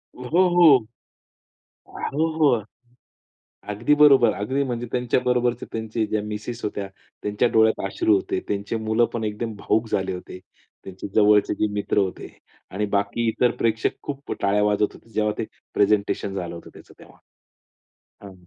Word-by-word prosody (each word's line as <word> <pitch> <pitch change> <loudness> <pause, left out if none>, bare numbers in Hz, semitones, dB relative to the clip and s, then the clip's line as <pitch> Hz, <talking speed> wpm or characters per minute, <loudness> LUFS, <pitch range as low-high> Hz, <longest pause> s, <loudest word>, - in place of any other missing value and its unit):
हो, 125 - -9 0.3
हो. 155 -10 +5 1.0
हो, 155 +3 -2
हो. 140 -8 +3 1.1
अगदी 115 +8 +1
बरोबर. 140 -5 +6
अगदी 130 +7 -1
म्हणजे 120 -2 -3
त्यांच्या 125 0 +1
बरोबरचे 125 -1 +1
त्यांचे 110 0 -2
ज्या 105 0 -1
मिसेस 105 +3 -6
होत्या, 100 -1 -3 0.4
त्यांच्या 105 +4 +1
डोळ्यात 110 0 +3
अश्रू 340 0 +2
होते. 375 0 -1
त्यांची 100 +2 -3
मुलं 110 +1 +1
पण 115 -2 -3
एकदम 110 +1 -3
भावुक 110 +2 0
झाले 95 -2 -1
होते. 90 0 -9 0.4
त्यांचे 95 +1 -8
जवळचे 105 -1 +4
जे 110 - +2
मित्र 105 0 -2
होते 95 -3 -1 0.4
आणि 105 +3 -1
बाकी 100 +4 0
इतर 120 +2 +2
प्रेक्षक 115 -1 0
खूप 140 0 -6
टाळ्या 100 +1 +2
वाजवत 105 0 +1
होते. 115 - -18
जेव्हा 105 -1 0
ते 115 - -2 0.3
प्रेझेंटेशन 100 -1 +1
झालं 90 -3 -5
होतं 85 - -11
त्याचं - - -16
तेव्हा. - - -17 1.1
हां 100 - -10
110 Hz, 150 wpm, -23 LUFS, 105-125 Hz, 1.1 s, बरोबर